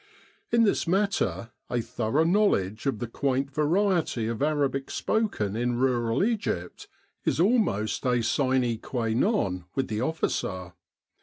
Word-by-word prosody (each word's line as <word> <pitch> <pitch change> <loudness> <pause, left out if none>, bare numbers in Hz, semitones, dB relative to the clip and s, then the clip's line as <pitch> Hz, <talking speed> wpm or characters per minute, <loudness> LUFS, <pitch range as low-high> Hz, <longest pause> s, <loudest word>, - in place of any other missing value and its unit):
In 235 0 +4
this 200 -4 +1
matter 190 - 0 0.2
a 120 - 0
thorough 115 +5 0
knowledge 155 - +1
of 135 - 0
the 120 - -3
quaint 135 +3 -1
variety 160 - +1
of 115 +1 -3
Arabic 140 -2 0
spoken 200 - -1
in 120 +1 0
rural 120 +1 +1
Egypt 205 - -2 0.4
is - - 0
almost 180 - +1
a 120 -2 +2
sine 130 -3 +1
qua 115 -2 -3
non 110 - 0
with 135 - -1
the 110 0 -2
officer. 95 - -2
130 Hz, 135 wpm, -27 LUFS, 115-170 Hz, 0.4 s, In